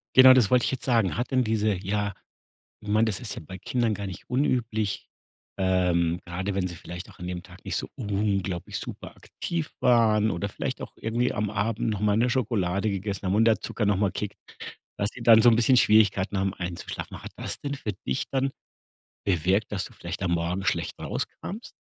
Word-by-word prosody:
Genau, 130 0 +10
das 125 -6 +4
wollte 125 -1 +4
ich - - 0
jetzt 130 - -4
sagen. 115 -6 +2
Hat 120 - -1
denn 130 -1 +3
diese, 110 -1 +1
ja 100 +2 -2 0.7
ich 105 - -11
meine, 110 +2 +4
das 105 -3 0
ist 120 - -4
ja - - -7
bei 95 +4 -8
Kindern 115 +3 0
gar 100 0 -5
nicht 95 -2 -8
unüblich, 120 -6 0 0.5
ähm, 90 -2 +2
gerade 95 +3 -3
wenn 95 -1 0
sie 85 - -5
vielleicht 90 +1 -8
auch - - -16
an 90 - -6
dem 90 -1 -4
Tag 90 +1 -16
nicht - - -2
so - - -2
unglaublich 100 -5 -1
super - - -8
aktiv 165 -3 -4
waren 115 -4 +4
oder 100 +2 -2
vielleicht - - -4
auch - - -8
irgendwie 120 +3 0
am 105 0 -1
Abend 105 +2 -1
noch 105 -3 -1
mal 105 0 +2
'ne 120 - +3
Schokolade 105 -6 0
gegessen, 100 0 -3
und 105 +4 +3
der 110 - +4
Zucker 110 - -2
noch 100 -1 +3
mal 100 -1 +2
kickt, 105 -1 -4 0.6
dass 100 +2 -1
die 125 - -10
dann 115 -1 +7
so 120 - +8
'n 115 - +4
bisschen 125 +2 +4
Schwierigkeiten 105 -3 +4
haben, 95 0 0
einzuschlafen. 90 -1 -6
Hat - - -9
das - - -4
denn 140 0 -3
für 110 -6 -4
dich 65 - -1
dann 135 0 +1 0.8
bewirkt, 95 +3 +1
dass 95 - -1
du - - -12
vielleicht - - -6
am 85 - 0
Morgen 85 +3 -1
schlecht - - -1
rauskamst? 215 +5 -5
105 Hz, 205 wpm, -26 LUFS, 95-115 Hz, 0.8 s, Genau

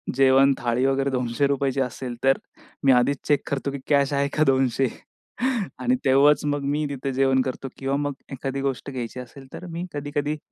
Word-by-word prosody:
जेवण 135 +1 +5
थाळी 120 +2 0
वगैरे 135 0 +1
₹200 135 +2 0
असेल 125 -1 -4
तर 135 0 +4 0.5
मी 135 - +6
आधीच 130 +2 +3
चेक 145 -1 +3
करतो, 140 0 -2
की 140 - -5
कॅश 140 -1 +3
आहे 140 0 +1
का 155 - +5
200? 130 -1 +2 0.9
आणि 255 +1 +2
तेव्हाच 140 +3 +5
मग 145 -1 -1
मी 150 +1 0
तिथे 135 -1 -3
जेवण 135 0 +3
करतो 130 +1 -4
किंवा 135 0 -1
मग 145 0 -2 0.2
एखादी 135 +1 -4
गोष्ट 135 0 -3
घ्यायची 125 -1 -5
असेल, 130 +2 -11
तर - - -8
मी 170 +2 -4
कधी-कधी 145 +1 -2
135 Hz, 175 wpm, -24 LUFS, 130-140 Hz, 0.9 s, मी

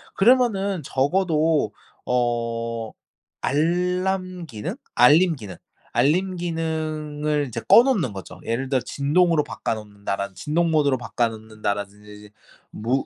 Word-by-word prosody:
그러면은 200 -5 +3
적어도 155 - +1 0.3
어 115 -2 -1 0.5
알람 180 +3 0
기능? 110 -7 -5 0.2
알림 160 +7 +6
기능, 100 -8 -9 0.3
알림 180 +5 +1
기능을 155 -3 -2
이제 115 0 -4
꺼 235 - +8
놓는 200 - +1
거죠. 95 -3 -9
예를 130 +4 -2
들어서 130 -3 0
'진동으로 155 +2 +2
바꿔 - - -3
놓는다.'라든 100 -2 -5
'진동 165 - 0
모드로 145 -4 +3
바꿔 120 0 -1
놓는다.'라든지 105 -2 -5
이제 105 0 -14 0.4
무 125 +5 -1
145 Hz, 275 characters per minute, -23 LUFS, 115-170 Hz, 0.5 s, 꺼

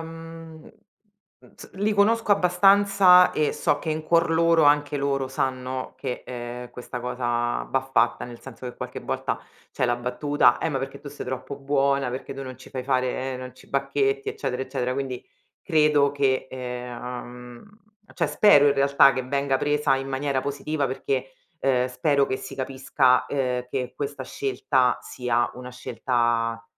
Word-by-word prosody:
uhm, 165 0 -10
mhmm, - - -15 0.9
z - - -12
li 205 +3 0
conosco 215 +2 +2
abbastanza 195 0 +5
e 150 - +1
so 145 - 0
che 160 - -3
in 155 0 -3
cuor 170 +1 +3
loro 165 0 +4
anche 145 0 +3
loro 140 -1 0
sanno 130 0 -3
che, 130 -2 -5
ehm, 120 0 -7
questa 125 0 -7
cosa 120 -1 -1
va 135 - +1
fatta. - - +2
Nel 120 -1 -10
senso 130 -1 -11
che, 125 - -8
qualche - - -6
volta - - -3 0.3
c'è - - 0
la 120 0 +1
battuta: 125 +4 +2
"Eh, - - -1
ma 140 -4 -1
perché 135 0 -6
tu 145 - -9
sei 145 - -8
troppo 130 +2 -5
buona, 140 -1 +1
perché 130 +2 -6
tu 135 0 -7
non 130 -1 -8
ci 130 - -15
fai 130 -1 -5
fare 130 0 -1
non 125 0 -8
ci - - -18
bacchetti," 415 - 0
eccetera, 425 - -3
eccetera. 130 -1 -2
Quindi, 130 -2 -4 0.4
credo 150 -4 +3
che 135 -2 +1
ehm 125 -1 -7
uhm, 210 +2 -22 0.3
cioè - - 0
spero, 145 -9 +6
i - - +4
realtà, 140 0 +5
che 130 -1 -2
venga 140 +1 0
presa 145 0 +1
in 135 0 -4
maniera 135 0 -1
positiva, 140 +2 -2
perché, 135 0 -3 0.3
ehm, 130 -3 +1
spero 140 +2 +2
che 130 - -2
si - - -8
capisca, 130 -1 +1
ehm, 125 -3 -1
che 125 -1 -4
questa 145 0 -4
scelta 140 - 0
sia 120 -1 -1
una 125 0 -8
scelta, 120 -2 -1
135 Hz, 170 wpm, -25 LUFS, 125-150 Hz, 0.9 s, spero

